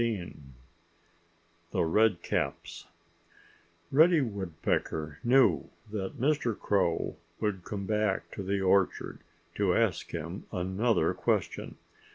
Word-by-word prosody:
*XV* 110 Hz, -7 st, -2 dB, 1.4 s
*THE -, -, +1 dB
REDCAPS* 105 Hz, +2 st, 0 dB, 1.0 s
Reddy 160 Hz, +3 st, +6 dB
Woodpecker 85 Hz, -, -2 dB
knew 120 Hz, -, +4 dB, 0.2 s
that 105 Hz, +4 st, -4 dB
Mr. 135 Hz, -5 st, +1 dB
Crow 90 Hz, -5 st, 0 dB, 0.2 s
would 105 Hz, -4 st, -1 dB
come 100 Hz, 0 st, -5 dB
back 105 Hz, -2 st, 0 dB
to -, -, -6 dB
the 100 Hz, +1 st, -1 dB
orchard 95 Hz, 0 st, +1 dB, 0.3 s
to 95 Hz, -3 st, +1 dB
ask 110 Hz, -8 st, +1 dB
him 85 Hz, +6 st, -6 dB
another 95 Hz, +6 st, +1 dB
question. -, -, -1 dB
100 Hz, 100 wpm, -30 LUFS, 90-115 Hz, 1.4 s, Reddy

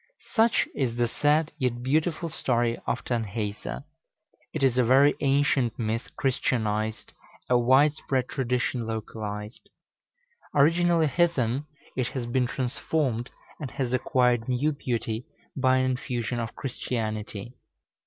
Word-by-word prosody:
Such 225 Hz, 0 st, +3 dB
is 125 Hz, -5 st, -1 dB
the 120 Hz, 0 st, +2 dB
sad 150 Hz, +5 st, +2 dB
yet 120 Hz, -2 st, -1 dB
beautiful 160 Hz, +5 st, +1 dB
story 120 Hz, -5 st, +1 dB
of -, -, -1 dB
Tanhäuser. 110 Hz, 0 st, -3 dB, 0.7 s
It 155 Hz, -, -3 dB
is 130 Hz, -3 st, +4 dB
a 125 Hz, -, +4 dB
very 135 Hz, +4 st, +6 dB
ancient 135 Hz, -4 st, +2 dB
myth 115 Hz, 0 st, -2 dB
Christianized, 110 Hz, -5 st, -1 dB, 0.3 s
a 125 Hz, -, +3 dB
wide 135 Hz, +5 st, +5 dB
spread 130 Hz, -2 st, -1 dB
tradition 125 Hz, -2 st, -1 dB
localized. 105 Hz, -1 st, -5 dB, 0.9 s
Originally 165 Hz, +3 st, +4 dB
heathen, 145 Hz, -4 st, +1 dB, 0.3 s
it 130 Hz, -2 st, 0 dB
has 125 Hz, -3 st, -2 dB
been 125 Hz, +1 st, +1 dB
transformed, 130 Hz, -1 st, -1 dB, 0.3 s
and 145 Hz, -4 st, -4 dB
has 130 Hz, -1 st, -2 dB
acquired 125 Hz, -2 st, +2 dB
new 130 Hz, +5 st, +2 dB
beauty 120 Hz, -4 st, -3 dB, 0.3 s
by 130 Hz, -1 st, +3 dB
an 130 Hz, 0 st, +2 dB
infusion 120 Hz, -1 st, -2 dB
of 115 Hz, -2 st, -4 dB
Christianity. 110 Hz, -4 st, -4 dB
125 Hz, 125 wpm, -27 LUFS, 115-140 Hz, 0.9 s, very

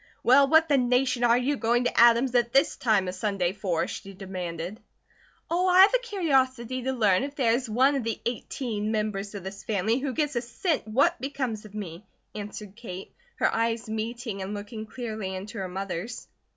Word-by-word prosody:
"Well, 275 Hz, +3 st, +6 dB
what 320 Hz, +3 st, +5 dB
the 280 Hz, -3 st, +3 dB
nation 250 Hz, 0 st, +1 dB
are 235 Hz, 0 st, +5 dB
you 265 Hz, +4 st, +1 dB
going 240 Hz, +1 st, +2 dB
to 245 Hz, -, -1 dB
Adam's 235 Hz, +2 st, +6 dB
at 240 Hz, -1 st, +2 dB
this 275 Hz, +4 st, +3 dB
time 210 Hz, -6 st, +2 dB
a 180 Hz, -, -3 dB
Sunday 185 Hz, -2 st, -1 dB
for?" 185 Hz, -5 st, -1 dB
she 195 Hz, 0 st, -8 dB
demanded. 185 Hz, 0 st, -5 dB, 0.7 s
"Oh, 350 Hz, +3 st, +1 dB
I 365 Hz, +1 st, +7 dB
have 400 Hz, +5 st, +7 dB
a -, -, +4 dB
curiosity 265 Hz, -, 0 dB
to 260 Hz, +2 st, -1 dB
learn 210 Hz, -7 st, +3 dB
if 280 Hz, +1 st, -5 dB
there 245 Hz, -5 st, +2 dB
is 245 Hz, 0 st, -1 dB
one 260 Hz, +6 st, +4 dB
of 275 Hz, -3 st, -1 dB
the 225 Hz, -1 st, -3 dB
eighteen 230 Hz, -3 st, -3 dB
members 210 Hz, -2 st, -2 dB
of 195 Hz, -, -6 dB
this 195 Hz, +1 st, -8 dB
family 220 Hz, +3 st, 0 dB
who 270 Hz, -1 st, -3 dB
gives 295 Hz, -2 st, -1 dB
a 240 Hz, -, +1 dB
cent 290 Hz, -, -2 dB
what 280 Hz, +10 st, +2 dB
becomes 255 Hz, -6 st, -3 dB
of 210 Hz, 0 st, -12 dB
me!" 185 Hz, -3 st, -6 dB, 0.3 s
answered 210 Hz, -1 st, -7 dB
Kate, 195 Hz, -5 st, -8 dB, 0.2 s
her -, -, +1 dB
eyes 230 Hz, 0 st, 0 dB
meeting 220 Hz, -1 st, -4 dB
and 195 Hz, +2 st, -4 dB
looking 215 Hz, +2 st, -7 dB
clearly 215 Hz, -6 st, -5 dB
into 200 Hz, +4 st, -7 dB
her 190 Hz, -, -3 dB
mother's. 195 Hz, +4 st, -5 dB
230 Hz, 195 wpm, -27 LUFS, 205-260 Hz, 0.7 s, I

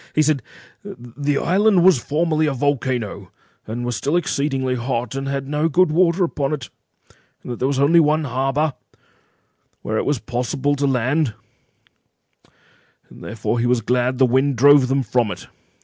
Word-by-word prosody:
He 155 Hz, -, +4 dB
said—"The 145 Hz, -, -4 dB
island 195 Hz, +2 st, +3 dB
was 180 Hz, -9 st, +5 dB
formerly 155 Hz, +1 st, 0 dB
a 145 Hz, -, 0 dB
volcano, 125 Hz, -8 st, -2 dB, 0.4 s
and 120 Hz, +3 st, -4 dB
was 120 Hz, -1 st, -2 dB
still 140 Hz, +10 st, -1 dB
exceedingly 135 Hz, -5 st, -1 dB
hot, 120 Hz, -1 st, -3 dB
and 135 Hz, 0 st, -4 dB
had 135 Hz, -1 st, -3 dB
no 150 Hz, +3 st, 0 dB
good 180 Hz, +2 st, +3 dB
water 175 Hz, +2 st, +2 dB
upon 150 Hz, -4 st, -2 dB
it; 135 Hz, -5 st, -6 dB, 0.7 s
and -, -, -7 dB
that 120 Hz, -, -6 dB
there 130 Hz, -, 0 dB
was 135 Hz, -1 st, -1 dB
only 155 Hz, +5 st, +5 dB
one 155 Hz, 0 st, +2 dB
harbour 135 Hz, +3 st, -1 dB, 1.1 s
where 110 Hz, -, -2 dB
it -, -, -2 dB
was 145 Hz, -1 st, 0 dB
possible 125 Hz, +5 st, -2 dB
to 140 Hz, +1 st, 0 dB
land, 130 Hz, 0 st, 0 dB, 1.8 s
therefore 115 Hz, +2 st, -4 dB
he 120 Hz, -, 0 dB
was 125 Hz, -1 st, +1 dB
glad 125 Hz, +3 st, 0 dB
that -, -, -10 dB
the 130 Hz, -, +4 dB
wind 130 Hz, +3 st, +1 dB
drove 140 Hz, +2 st, +5 dB
them 135 Hz, +1 st, 0 dB
from 120 Hz, -1 st, 0 dB
it." -, -, -7 dB
135 Hz, 165 wpm, -20 LUFS, 125-150 Hz, 1.8 s, was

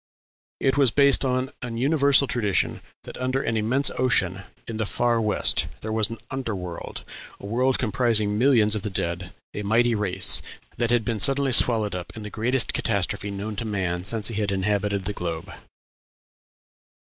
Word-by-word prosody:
It 135 Hz, 0 st, +1 dB
was 140 Hz, -3 st, +5 dB
based 140 Hz, +3 st, +4 dB
on 130 Hz, 0 st, -1 dB
an 120 Hz, -2 st, -5 dB
universal 140 Hz, +1 st, +3 dB
tradition 105 Hz, -8 st, -1 dB, 0.2 s
that -, -, -10 dB
under 130 Hz, +1 st, -1 dB
"an 115 Hz, -, -1 dB
immense 120 Hz, +6 st, +2 dB
ocean," 100 Hz, -7 st, +1 dB, 0.2 s
in 115 Hz, -, -5 dB
"the 110 Hz, -, -1 dB
far 120 Hz, 0 st, +1 dB
west," 95 Hz, -6 st, +2 dB
there 110 Hz, -, -5 dB
was 110 Hz, -1 st, +1 dB
an 115 Hz, -, -6 dB
"under 130 Hz, -5 st, -3 dB
world," 90 Hz, -2 st, -7 dB, 0.4 s
a -, -, -10 dB
world 125 Hz, +5 st, +1 dB
comprising 110 Hz, -3 st, +1 dB
millions 115 Hz, -3 st, +3 dB
of 105 Hz, -, -1 dB
the 105 Hz, -, -3 dB
dead, 90 Hz, -1 st, -2 dB, 0.2 s
a -, -, -4 dB
mighty 115 Hz, +3 st, +2 dB
race, 95 Hz, -4 st, +3 dB, 0.4 s
that 120 Hz, -, 0 dB
had 120 Hz, -2 st, +2 dB
been 115 Hz, -3 st, -2 dB
suddenly 135 Hz, +3 st, +2 dB
swallowed 110 Hz, -5 st, +4 dB
up 90 Hz, -1 st, -6 dB
in 110 Hz, -, -7 dB
the 105 Hz, -, -7 dB
greatest 120 Hz, +4 st, +1 dB
catastrophe 100 Hz, -1 st, 0 dB
known 100 Hz, +2 st, -5 dB
to 115 Hz, -, -2 dB
man 90 Hz, -4 st, -2 dB
since 105 Hz, +1 st, +2 dB
he 110 Hz, -2 st, -3 dB
had 100 Hz, -1 st, -1 dB
inhabited 100 Hz, 0 st, -1 dB
the 105 Hz, -, -2 dB
globe. 85 Hz, 0 st, -5 dB
110 Hz, 175 wpm, -24 LUFS, 100-125 Hz, 0.4 s, was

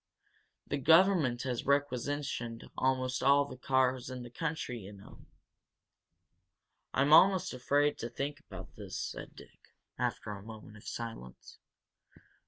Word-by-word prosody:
The 145 Hz, -, -2 dB
government 160 Hz, -5 st, +4 dB
has 125 Hz, -2 st, -3 dB
requisitioned 140 Hz, -3 st, -1 dB
almost 130 Hz, -1 st, 0 dB
all 140 Hz, +2 st, +5 dB
the 130 Hz, -, -9 dB
cars 130 Hz, 0 st, +1 dB
in 130 Hz, -1 st, -6 dB
the 120 Hz, -, -10 dB
country, 150 Hz, -4 st, -3 dB
you 100 Hz, 0 st, -10 dB
know." 100 Hz, -1 st, -15 dB, 1.6 s
"I'm 140 Hz, +3 st, +3 dB
almost 185 Hz, +2 st, +6 dB
afraid 145 Hz, +3 st, +1 dB
to 115 Hz, -, -4 dB
think 140 Hz, +5 st, -4 dB
about 95 Hz, -, -11 dB
this," -, -, -7 dB
said -, -, -6 dB
Dick, -, -, -17 dB, 0.2 s
after 105 Hz, -, -2 dB
a 100 Hz, -1 st, -7 dB
moment 110 Hz, 0 st, -11 dB
of 105 Hz, -, -14 dB
silence. 115 Hz, -, -8 dB
130 Hz, 130 wpm, -32 LUFS, 115-145 Hz, 1.6 s, almost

